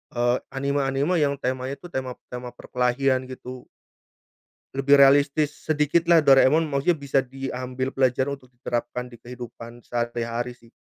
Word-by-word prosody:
eee, 120 +1 +2
anime-anime 140 +4 0
yang 140 -2 +2
temanya 130 0 -3
itu 175 +4 -13
tema 130 -3 -4 0.2
tema 125 0 -7
perkelahian 130 +1 0
gitu. 130 -1 -9 1.1
Lebih 140 +1 +4
realistis 140 +2 +4 0.2
sedikitlah 160 +2 +3
Doraemon 140 +4 +6
maksudnya 150 +4 +1
bisa 140 -1 +1
diambil 130 0 -5
pelajaran 130 +1 +1
untuk 130 -3 -11
diterapkan 125 0 -4
di 120 -2 -14
kehidupan 120 -1 -10
sehari-hari 120 0 -3
sih. 115 -1 -21
130 Hz, 125 wpm, -24 LUFS, 125-140 Hz, 1.1 s, Doraemon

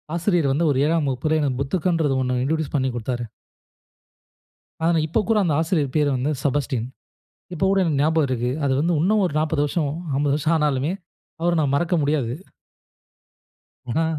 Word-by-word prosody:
ஆசிரியர் 170 -5 +1
வந்து 165 +5 +1
ஒரு 135 - 0
7ஆம் 160 -2 +1
வகுப்பில 155 +5 0
எனக்கு 130 -3 -1
புத்தகன்றது 160 -1 0
ஒண்ணு 125 -1 0
இன்ட்ரொடியூஸ் 155 +1 -1
பண்ணி 130 -2 +1
குடுத்தாரு. 120 +1 -3 1.6
ஆனா, 170 -1 +3
இப்ப 165 +8 0
கூட 225 -2 +3
அந்த 155 -5 +1
ஆசிரியர் 155 -5 0
பேரு 150 -1 +3
வந்து 135 +4 -1
செபஸ்டியன். 135 -4 -1 0.7
இப்போ 185 +3 0
கூட 195 0 +3
எனக்கு 155 -5 0
ஞாபகம் 155 -1 +2
இருக்கு. 125 -1 -1 0.2
அது 135 - +2
வந்து 170 +3 +1
இன்னும் 210 +3 +2
ஒரு 175 - -2
40 155 -1 0
வருஷம், 150 0 -1 0.3
50 145 -1 +1
வருஷம் 155 +2 +1
ஆனாலுமே, 150 0 0 0.5
அவர 170 0 +2
நான் 140 -2 0
மறக்க 175 +4 +1
முடியாது. 140 -5 0 1.6
ஆனா, 160 +7 +1
150 Hz, 160 wpm, -22 LUFS, 135-165 Hz, 1.6 s, ஆனா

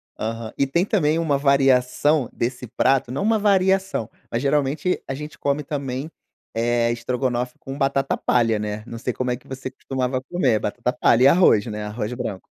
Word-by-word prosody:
Aham. 115 0 -4
E 140 - +3
tem 155 +6 +1
também 165 -7 +1
uma 155 -4 +1
variação 135 0 +3
desse 125 +1 -3
prato, 130 +2 +1
não 135 - -2
uma 220 +1 +3
variação, 190 - +2 0.2
mas 115 - -1
geralmente 145 +4 0
a - - -3
gente 150 +3 -8
come 140 +1 -1
também, 140 0 -4 0.5
eh, 120 +1 +1
estrogonofe 125 +1 -2
com 135 +1 -7
batata 135 -1 0
palha, 115 -3 +2
né, 105 0 -4
não 115 - -7
sei 125 +2 -3
como 125 +1 -2
é 125 - -1
que 125 - -22
você 130 0 -6
costumava 130 -1 -3
comer, 130 -6 +1
batata 120 +4 -2
palha 125 -4 +3
e - - +8
arroz, 140 - +5
né, 105 -1 -4
arroz 105 +1 -4
branco. 115 -6 -5
130 Hz, 180 wpm, -22 LUFS, 120-145 Hz, 0.5 s, e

